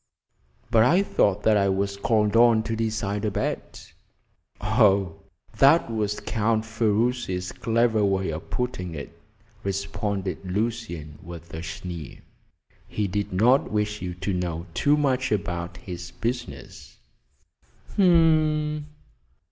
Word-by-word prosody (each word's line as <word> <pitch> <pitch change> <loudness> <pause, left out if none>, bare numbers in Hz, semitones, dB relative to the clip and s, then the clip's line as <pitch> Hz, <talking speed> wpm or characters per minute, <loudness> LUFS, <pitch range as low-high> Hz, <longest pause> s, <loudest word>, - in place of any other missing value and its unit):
"But 115 -2 +5
I 175 - +4
thought 100 - +1
that 110 -1 +4
I 100 -1 +2
was 100 +1 0
called 105 +1 +1
on 115 -1 +5
to 115 - -2
decide 110 -2 -2
a 105 - +1
bet." 95 - -4 0.7
"Oh, 100 -5 +3 0.4
that 140 -2 +5
was 105 -2 -1
Count 110 0 0
Ferruci's 110 -4 0
clever 115 -1 +1
way 95 -2 +1
of 80 +1 -7
putting 90 -9 -3
it," 70 - -7 0.5
responded 100 0 -3
Lucian, 95 -6 -3
with 85 -2 -10
a 80 - -5
sneer. 85 -1 -7 0.7
"He 105 -1 -2
did 100 +2 -2
not 120 +9 +3
wish 105 0 -1
you 90 -1 -4
to 95 +3 -3
know 85 -2 -3
too 145 - +3
much 130 -4 +1
about 85 -3 -2
his 90 -1 -7
business." 115 - -6 1.0
"H'm! 155 -4 +3
105 Hz, 125 wpm, -25 LUFS, 90-115 Hz, 1.0 s, But